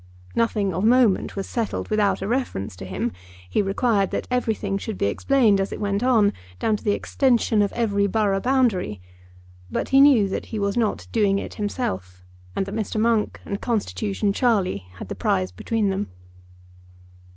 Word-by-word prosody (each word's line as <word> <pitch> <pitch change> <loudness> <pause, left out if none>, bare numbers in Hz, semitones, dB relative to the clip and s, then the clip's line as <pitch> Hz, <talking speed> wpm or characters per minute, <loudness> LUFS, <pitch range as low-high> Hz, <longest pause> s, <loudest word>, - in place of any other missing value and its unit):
Nothing 210 -4 +1
of 185 +4 -2
moment 235 -3 +3
was 195 -1 -4
settled 230 -3 -3
without 205 -3 +2
a - - -2
reference 215 - -2
to 95 - -7
him. 95 -1 -2 0.4
He 150 - +1
required 200 0 +1
that - - -3
everything 220 -5 0
should 215 -1 -5
be - - 0
explained 215 - +3
as 195 - -2
it - - -5
went 200 0 -1
on, 225 -5 +3 0.2
down 220 - +1
to - - -16
the 205 - +2
extension 235 -3 +2
of 200 - +1
every 205 -4 +1
borough 200 -1 +1
boundary; 225 - +1 0.7
but - - -2
he 270 +1 +6
knew 265 -8 +6
that 190 - -4
he 220 - -5
was 200 -1 0
not 230 -3 0
doing 205 -3 +2
it - - -5
himself, 95 - -4 0.3
and - - 0
that 200 - -7
Mr. 215 0 -2
Monk 225 -1 +1
and 200 - -4
Constitution 210 -3 -1
Charlie 195 - +1
had - - -8
the - - -4
prize 95 0 0
between 210 - -1
them. 195 +1 -2
205 Hz, 175 wpm, -23 LUFS, 195-230 Hz, 0.7 s, he